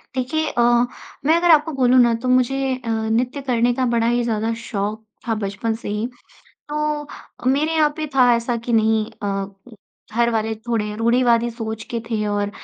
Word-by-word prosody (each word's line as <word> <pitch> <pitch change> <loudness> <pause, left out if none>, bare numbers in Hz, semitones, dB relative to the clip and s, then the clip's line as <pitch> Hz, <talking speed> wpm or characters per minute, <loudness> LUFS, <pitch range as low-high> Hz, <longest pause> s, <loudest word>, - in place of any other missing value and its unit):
देखिए 305 +5 -1
अ, 240 - +4 0.6
मैं 315 +3 +5
अगर 345 0 +4
आपको 315 0 +4
बोलूँ 255 0 +5
ना 235 -1 +4
तो - - -1
मुझे 260 +1 +2
अ, - - -3
नृत्य 225 +5 -1
करने 245 -2 +1
का 255 +1 0
बड़ा 230 0 +2
ही 240 0 +1
ज़्यादा 225 -1 -1
शौक 210 0 -3 0.2
था 225 - +1
बचपन 205 +2 -2
से - - -4
ही। 210 +3 -2 0.6
तो, 300 0 -2 0.4
मेरे 290 +5 +2
यहाँ 305 -2 +3
पे 310 -1 -3
था 250 -2 +5
ऐसा 235 +1 -2
कि 240 - -1
नहीं 220 -1 +3 0.2
अ, 195 -1 -1 0.7
घरवाले 225 -2 +1
थोड़े 220 -2 -3
रूढ़िवादी 235 +1 +3
सोच 220 -1 -5
के 235 - -2
थे 220 -2 -1
और 205 0 -1
235 Hz, 175 wpm, -21 LUFS, 220-260 Hz, 0.7 s, मैं